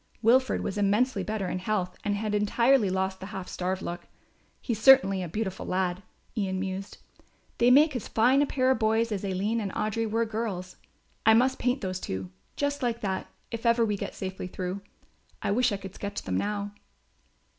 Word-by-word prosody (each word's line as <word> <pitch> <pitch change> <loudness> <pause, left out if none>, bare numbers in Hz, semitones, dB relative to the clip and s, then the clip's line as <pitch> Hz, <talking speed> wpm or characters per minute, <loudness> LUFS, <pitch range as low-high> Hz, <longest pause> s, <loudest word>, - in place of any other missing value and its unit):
Wilfred 250 +2 +4
was 205 - -3
immensely 205 +3 +2
better 210 0 -2
in 185 - -2
health 185 -2 -1
and 205 0 0
had 210 +1 -2
entirely 225 +2 +3
lost 190 0 -1
the 190 - -7
half 190 -2 -6
starved 185 +1 -3
look. 175 0 -5 0.5
"He's 225 -4 -3
certainly 240 -8 +6
a 180 - -3
beautiful 205 +1 -3
lad," 185 0 -1 0.3
Ian 190 -4 -1
mused. 190 +1 -4 0.6
"They 240 - +5
make 290 +3 +6
as 245 - -3
fine 250 +5 +4
a 290 - +2
pair 260 -1 +2
of 265 - +1
boys 225 +1 +2
as 205 -2 -2
Aline 200 +4 0
and 200 -2 -3
Audry 215 +1 -1
were 225 +2 +1
girls. 210 -5 -4 0.5
I 220 0 +6
must 260 +3 +3
paint 250 +2 0
those 185 -1 -3
two, 95 - -5 0.2
just 285 0 -1
like 235 -2 -1
that, 190 -2 -2 0.2
if 230 -1 -5
ever 235 -1 +4
we 210 -2 0
get - - -5
safely 190 -1 -5
through. 185 +1 -4 0.6
I - - 0
wish 245 +3 +3
I 200 - -1
could 195 -1 -9
sketch 200 0 -5
them 95 - -2
now." 205 - -2
210 Hz, 190 wpm, -28 LUFS, 190-230 Hz, 0.6 s, certainly